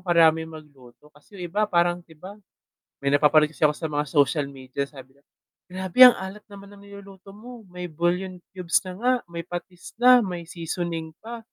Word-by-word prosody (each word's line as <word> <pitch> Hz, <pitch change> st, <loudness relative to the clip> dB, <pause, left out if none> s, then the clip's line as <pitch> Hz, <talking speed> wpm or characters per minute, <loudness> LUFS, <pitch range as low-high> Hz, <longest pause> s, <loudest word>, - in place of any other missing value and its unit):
karaming 160 Hz, -1 st, +3 dB
magluto, 145 Hz, -3 st, -15 dB
kasi 150 Hz, +8 st, -19 dB
'yong -, -, -5 dB
iba 210 Hz, +2 st, +2 dB
parang 175 Hz, -1 st, +1 dB
iba 180 Hz, +5 st, -13 dB, 0.6 s
may 140 Hz, 0 st, 0 dB
napapansin 150 Hz, +1 st, +4 dB
kasi -, -, -18 dB
ako 150 Hz, 0 st, +4 dB
sa 165 Hz, -, -3 dB
mga 150 Hz, -1 st, -2 dB
social 145 Hz, 0 st, +2 dB
media, 135 Hz, 0 st, -6 dB
sabi 135 Hz, -2 st, -14 dB
nila 140 Hz, -, -29 dB, 0.5 s
grabe 185 Hz, +4 st, -4 dB
ang 250 Hz, -1 st, +10 dB
alat 190 Hz, +2 st, -8 dB
naman 200 Hz, 0 st, -13 dB
ng 200 Hz, -, -16 dB
niluluto 200 Hz, -1 st, -14 dB
mo 235 Hz, +4 st, -12 dB
may 180 Hz, 0 st, -8 dB
bouillon 175 Hz, +3 st, -2 dB, 0.2 s
cubes 180 Hz, -1 st, +1 dB
na -, -, -5 dB
nga 250 Hz, +2 st, +2 dB, 0.2 s
may 170 Hz, 0 st, -6 dB
patis 175 Hz, 0 st, -8 dB
na, 250 Hz, 0 st, +8 dB
may 180 Hz, -6 st, -3 dB
seasoning 165 Hz, -1 st, -5 dB
pa, 235 Hz, +1 st, -7 dB
175 Hz, 180 wpm, -24 LUFS, 150-195 Hz, 0.6 s, ang